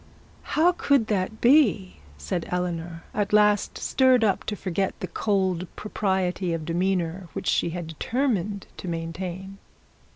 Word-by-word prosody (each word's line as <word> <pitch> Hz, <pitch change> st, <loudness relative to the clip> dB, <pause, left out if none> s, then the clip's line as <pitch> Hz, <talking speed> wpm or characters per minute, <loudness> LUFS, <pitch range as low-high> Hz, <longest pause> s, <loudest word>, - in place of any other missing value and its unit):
'How 335 Hz, +3 st, +3 dB
could 280 Hz, -8 st, +2 dB
that 200 Hz, +3 st, -2 dB
be?' 235 Hz, -8 st, +4 dB, 0.2 s
said 75 Hz, -, -3 dB
Eleanor, 170 Hz, -2 st, -3 dB
at 205 Hz, -1 st, -1 dB
last 210 Hz, -1 st, +3 dB
stirred 260 Hz, -3 st, +3 dB
up 200 Hz, -3 st, +1 dB
to 210 Hz, -, -2 dB
forget 190 Hz, 0 st, -2 dB
the -, -, -3 dB
cold 185 Hz, -1 st, 0 dB
propriety 190 Hz, -4 st, -1 dB
of 160 Hz, -2 st, -3 dB
demeanour 175 Hz, +1 st, -1 dB
which -, -, -5 dB
she -, -, +2 dB
had 175 Hz, 0 st, -5 dB
determined 205 Hz, -, -1 dB
to -, -, -7 dB
maintain. 180 Hz, +3 st, -5 dB
190 Hz, 135 wpm, -25 LUFS, 175-210 Hz, 0.2 s, be